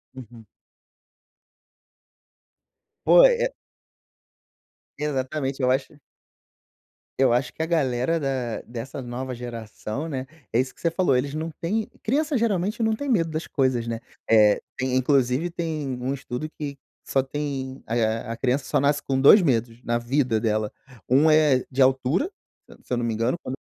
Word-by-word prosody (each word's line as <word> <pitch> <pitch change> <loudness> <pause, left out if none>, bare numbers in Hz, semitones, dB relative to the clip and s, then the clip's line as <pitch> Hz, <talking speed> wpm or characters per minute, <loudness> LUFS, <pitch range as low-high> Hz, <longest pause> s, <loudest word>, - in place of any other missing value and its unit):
Uhum. 120 -3 -12 2.6
Poi - - +8
é. - - -1 1.5
Exatamente, 135 -1 -2
eu 125 - +4
acho 140 +2 -2 1.2
eu 130 -3 +4
acho 125 +1 0
que - - -6
a - - +1
galera 155 -1 +1
da 130 -5 -2
dessa 125 +3 -7
nova 125 +1 -5
geração, 120 +3 -6
né, 135 -4 -4 0.3
é 115 - +2
isso 130 0 -1
que - - -21
você 170 - +2
falou. 170 -7 +2
Eles 140 +3 0
não 160 +1 -3
têm 205 +8 -2 0.2
criança, 290 +4 +1
geralmente, 210 -1 0
não 220 0 +2
têm 285 +3 -4
medo 165 -9 +2
das 155 +1 -4
coisas, 130 -4 0
né. 115 -1 -3 0.3
Eh, 105 -2 +5 0.2
tem 130 0 -1
inclusive 130 +4 +2
tem 160 -4 -3
um 130 +2 -1
estudo 135 +2 -5
que 140 -2 -4 0.3
só 135 - +1
tem 135 -1 -5
alia 115 -1 0
a 115 - -4
criança 130 +2 0
só - - +1
nasce 145 +1 +2
com 135 -1 0
2 185 +9 +8
medos 120 -5 0
na 120 0 0
vida 120 -1 +1
dela. 110 -1 0 0.4
Um 145 +5 +5
é 150 -4 +4
de 135 0 -1
altura, 135 - +2 0.4
se - - -14
se - - -3
eu - - +1
não 120 - -1
me 115 - -1
engano, 115 +8 0
quando 130 - -4
135 Hz, 160 wpm, -24 LUFS, 120-155 Hz, 2.6 s, Poi